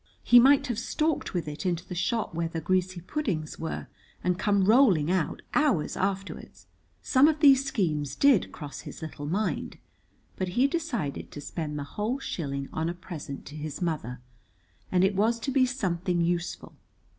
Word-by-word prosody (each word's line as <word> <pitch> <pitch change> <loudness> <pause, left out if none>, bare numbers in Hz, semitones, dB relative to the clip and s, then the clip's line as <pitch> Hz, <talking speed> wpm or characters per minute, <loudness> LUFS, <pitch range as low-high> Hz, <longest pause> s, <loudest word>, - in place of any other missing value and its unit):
He 245 - +8
might 275 +3 +6
have 240 -5 -2
stalked 310 -2 -1
with 170 -3 -1
it 150 +4 -5
into 175 -2 -2
the - - -6
shop 190 +4 -1
where 165 0 -1
the 165 0 -4
greasy 185 +2 0
puddings 180 - -3
were 160 - -4 0.4
and 180 0 0
come 200 -2 +2
rolling 195 - +5
out 185 -4 -1
hours 280 - +2
afterwards. 195 +1 -4 0.4
Some 265 +2 +5
of 310 -1 +1
these 275 -3 +6
schemes 155 - -1
did 275 -8 +4
cross 145 -3 -8
his - - -9
little 145 -2 -6
mind, 200 +7 -2 0.6
but 185 - -1
he 255 - +5
decided 275 - -2
to - - -9
spend 150 0 -5
the 145 - -3
whole 210 - -2
shilling 140 - -4
on 160 +1 -1
a 175 - -4
present 165 -6 -8
to 145 - -10
his 150 -1 -5
mother, 150 -8 -3 0.7
and 180 0 +3
it 195 +1 +3
was 225 +4 +2
to 270 - -2
be 260 -1 +4
something 180 -8 -1
useful. 170 +1 -2
185 Hz, 175 wpm, -27 LUFS, 160-240 Hz, 0.7 s, He